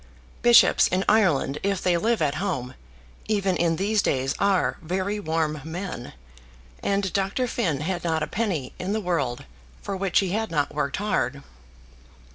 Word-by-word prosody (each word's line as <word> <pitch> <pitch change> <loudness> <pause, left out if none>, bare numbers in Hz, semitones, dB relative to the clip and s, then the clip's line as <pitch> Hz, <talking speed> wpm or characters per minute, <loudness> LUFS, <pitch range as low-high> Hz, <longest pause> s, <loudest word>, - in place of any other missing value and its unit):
Bishops 240 0 +6
in 185 +2 0
Ireland, 170 -9 +3
if 200 -1 0
they 180 -1 +3
live 220 +2 +1
at 145 -2 +1
home, 130 -10 -2 0.5
even 200 -3 +1
in 170 -1 +1
these 205 +4 +1
days, 135 -4 0
are 200 -2 +2
very 190 +5 -2
warm 160 -4 -1
men; 160 -5 -6 0.7
and 195 -2 0
Dr. 195 +6 0
Finn 180 - -1
had 175 +3 -2
not 160 -2 0
a - - -2
penny 180 - -2
in 190 +3 -2
the 220 - 0
world 160 - -2 0.4
for 200 - -3
which 190 -1 0
he 195 - +3
had 220 +4 -1
not 145 -3 -1
worked 140 -2 -1
hard. 195 -9 -1
185 Hz, 160 wpm, -25 LUFS, 155-200 Hz, 0.7 s, Bishops